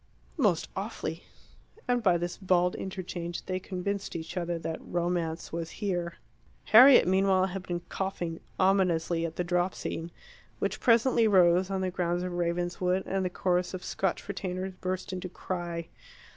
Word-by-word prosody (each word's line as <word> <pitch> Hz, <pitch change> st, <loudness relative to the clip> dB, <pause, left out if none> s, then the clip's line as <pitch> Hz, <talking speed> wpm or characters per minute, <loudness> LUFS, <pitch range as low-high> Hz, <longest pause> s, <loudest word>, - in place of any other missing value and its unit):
"Most -, -, +2 dB
awfully." -, -, -4 dB, 0.6 s
And 245 Hz, -1 st, +2 dB
by 185 Hz, -5 st, +4 dB
this 175 Hz, +1 st, -3 dB
bald 180 Hz, -2 st, +2 dB
interchange 180 Hz, -2 st, -5 dB
they 185 Hz, 0 st, -2 dB
convinced 190 Hz, +2 st, -4 dB
each 160 Hz, +1 st, -5 dB
other 175 Hz, -1 st, -1 dB
that 165 Hz, 0 st, -4 dB
Romance 170 Hz, -2 st, -2 dB
was 165 Hz, -1 st, -3 dB
here. 175 Hz, -5 st, -2 dB, 0.5 s
Harriet, 245 Hz, 0 st, +8 dB
meanwhile, 190 Hz, 0 st, +3 dB
had 190 Hz, 0 st, -4 dB
been 175 Hz, -1 st, -2 dB
coughing 175 Hz, -2 st, -4 dB, 0.2 s
ominously 175 Hz, -3 st, +2 dB
at 160 Hz, -, -9 dB
the 180 Hz, -, -1 dB
drop 175 Hz, +1 st, 0 dB
scene, 165 Hz, +1 st, -4 dB, 0.5 s
which -, -, -2 dB
presently 235 Hz, -1 st, +4 dB
rose 185 Hz, -2 st, +5 dB
on 190 Hz, -1 st, -1 dB
the 185 Hz, -1 st, -1 dB
grounds 175 Hz, -1 st, -1 dB
of 180 Hz, -1 st, -3 dB
Ravenswood, 175 Hz, +2 st, 0 dB
and 195 Hz, 0 st, -1 dB
the 180 Hz, -, 0 dB
chorus 180 Hz, 0 st, 0 dB
of 185 Hz, -, -7 dB
Scotch 190 Hz, 0 st, -2 dB
retainers 190 Hz, -1 st, -4 dB
burst 185 Hz, +1 st, -3 dB
into 185 Hz, 0 st, -4 dB
cry. 175 Hz, -2 st, -4 dB
180 Hz, 155 wpm, -29 LUFS, 175-190 Hz, 0.6 s, Harriet